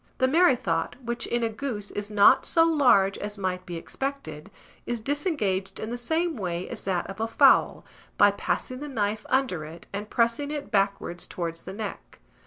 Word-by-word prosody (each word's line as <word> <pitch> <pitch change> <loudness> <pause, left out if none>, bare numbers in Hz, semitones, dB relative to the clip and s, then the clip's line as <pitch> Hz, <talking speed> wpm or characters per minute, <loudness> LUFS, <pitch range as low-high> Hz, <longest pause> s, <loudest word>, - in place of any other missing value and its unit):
The 260 - +3
merrythought, 260 - +2
which 235 0 -3
in 240 0 0
a 230 - +1
goose 215 -3 -5
is 205 0 -4
not 205 -1 +6
so 330 - +4
large 245 -12 +4
as 205 0 -5
might 185 -2 -3
be 175 - -5
expected, 200 - -5 0.4
is 240 -1 -2
disengaged 220 - -1
in 220 - -5
the - - -2
same 320 +6 -1
way 180 -3 -3
as - - -7
that 185 -2 0
of 195 +2 -8
a 225 - 0
fowl 225 - +4 0.3
by - - +6
passing 255 -1 -3
the 295 - -6
knife 210 -4 -2
under 260 -12 +1
it, 160 +2 -10
and 205 +1 -5
pressing 235 +5 +1
it 295 -7 -5
backwards 195 -4 0
towards 165 -2 -5
the 190 - -6
neck. 210 -1 -7
215 Hz, 185 wpm, -26 LUFS, 190-260 Hz, 0.4 s, not